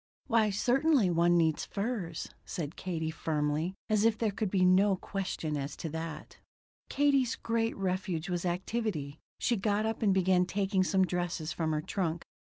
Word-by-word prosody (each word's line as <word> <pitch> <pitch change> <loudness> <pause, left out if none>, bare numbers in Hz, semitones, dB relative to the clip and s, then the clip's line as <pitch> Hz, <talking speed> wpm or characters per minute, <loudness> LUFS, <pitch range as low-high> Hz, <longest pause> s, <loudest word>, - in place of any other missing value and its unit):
"Why 225 -3 +3
certainly 245 - +3
one 170 +1 +4
needs 160 -2 +2
furs," 200 -6 -3
said 160 -2 -5
Katie 160 -3 -3
firmly, 155 +3 -1
as 215 -1 +2
if 225 -1 +3
there 225 -2 0
could 210 0 -2
be 185 -1 +3
no 190 +2 +5
question 185 -5 -3
as 140 0 -4
to 165 - -4
that. 160 0 -6 0.5
Katie's 275 -4 +2
great 230 0 -1
refuge 185 -3 -2
was 175 -2 -2
activity. 180 -5 -2 0.2
She 240 - +1
got 205 +1 +1
up 225 0 -2
and 210 -3 +3
began 185 -1 +3
taking 195 -1 +1
some 190 0 +3
dresses 175 -3 -2
from 160 -2 -1
her 155 -1 0
trunk. 170 -1 -2
185 Hz, 165 wpm, -31 LUFS, 165-215 Hz, 0.5 s, no